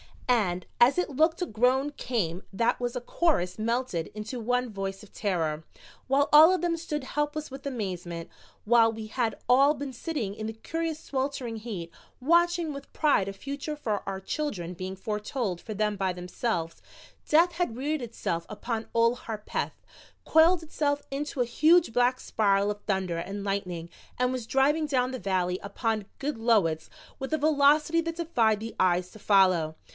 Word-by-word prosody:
And 190 -8 +1
as 245 +6 +6
it 360 - +1
looked 320 +5 +2
a - - +1
groan 255 +4 +2
came 200 - -2
that 230 +4 +1
was 245 0 -2
a 250 - -2
chorus 240 - 0
melted 230 -6 -1
into 220 +4 -5
one 245 +1 0
voice 195 0 -5
of 210 - -15
terror, 160 -6 -1 0.4
while 275 +2 +3
all 315 +4 +9
of 370 - 0
them 345 -1 0
stood 300 -3 -4
helpless 295 +2 -2
with 270 +1 -7
amazement. 180 -9 -4 0.3
While 225 0 +5
we 220 -1 -7
had 225 -2 -1
all 275 +4 +6
been 280 -2 -6
sitting 245 - -3
in 215 +1 -5
the 220 - -4
curious 325 +7 -3
sweltering 265 -5 -3
heat, 200 -7 -6 0.3
watching 340 +2 +3
with 280 0 -9
pride 290 -11 +2
a 195 - -4
future 280 +8 -5
for 220 -8 -2
our 195 -1 -3
children 190 - -3
being 185 +2 -5
foretold 210 -1 -3
for 220 - -6
them 210 0 0
by 190 -1 0
themselves, 180 -1 -3 0.5
death 335 +3 +5
had 340 -9 -2
reared 295 +3 -1
itself 190 -8 -3
behind 220 +1 -4
Old 230 +1 +3
Harpeth, 215 -2 -4 0.4
coiled 330 +2 +5
itself 290 -2 -1
into 280 -1 -2
a - - +3
huge 310 +3 +4
black 245 +1 +3
spiral 200 -1 +2
of 205 0 -7
thunder 190 -4 0
and 195 +4 -5
lightning 180 -4 -3 0.3
and 250 0 +1
was 250 -3 -4
driving 295 +5 +2
down 255 -3 +1
the 255 - -5
valley 185 -2 0
upon 215 +1 -2
Goodloets 225 - +1 0.3
with 265 +3 -4
a - - +3
velocity 305 +2 +4
that 330 0 -4
defied 235 -11 +1
the 225 +1 -5
eyes 180 0 +2
to 215 - -13
follow. 185 -6 +3
235 Hz, 170 wpm, -28 LUFS, 195-285 Hz, 0.5 s, all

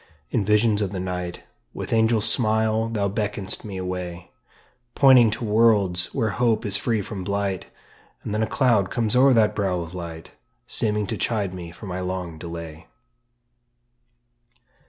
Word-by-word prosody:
In - - +1
visions 105 +1 +3
of 100 -2 -1
the 95 - -3
night 90 -1 -4 0.3
With - - -4
angel 110 0 +3
smile 110 0 +1
thou 105 -3 0
beckon'st 105 -1 -1
me 100 -3 -6
away, 90 -1 -5 0.6
Pointing 130 -4 +7
to 110 - -4
worlds 105 -5 +3
where 115 -6 -1
hope 115 +1 +1
is 100 -1 +1
free 110 0 0
from 95 -1 -6
blight; 100 -1 -2 0.6
And - - -4
then 105 - 0
a 110 - +1
cloud 115 -8 +2
comes 115 -2 -1
o'er 135 +2 +6
that 110 -3 +3
brow 95 -4 -1
of 85 0 -7
light, 85 -3 -8 0.3
Seeming 105 -1 -1
to - - -4
chide 105 -5 -1
me 90 -2 -7
for 90 +5 -11
my 90 -1 -4
long 90 -3 -4
delay. 85 -1 -8
100 Hz, 155 wpm, -24 LUFS, 90-110 Hz, 0.6 s, Pointing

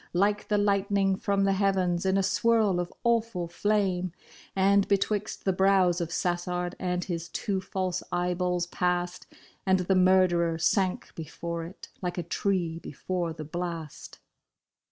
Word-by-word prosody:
Like 205 +3 +1
the 210 - +2
lightning 200 -1 +2
from 200 +1 0
the 195 0 +3
heavens 190 -2 +1
in 190 +1 +3
a 195 - +2
swirl 220 -3 +2
of 175 0 -3
awful 230 -7 +1
flame, 185 -1 0 0.4
And 195 +1 +4
betwixt 205 +1 -1
the 190 - +2
brows 190 -2 +3
of 170 - -2
Sassard 175 0 -1
and 180 -1 -1
his 170 -2 -4
two 195 -4 -2
false 185 -1 -2
eyeballs 180 0 0
passed. 180 0 -2 0.4
And 190 -1 +3
the 180 +2 +1
murderer 180 -3 +4
sank 180 +3 0
before 165 +1 -5
it 175 +4 -11
like 180 -1 -3
a 175 - -1
tree 170 -1 -1
before 175 +3 -3
the 155 -1 -7
blast. 165 -1 -6
185 Hz, 145 wpm, -28 LUFS, 175-195 Hz, 0.4 s, And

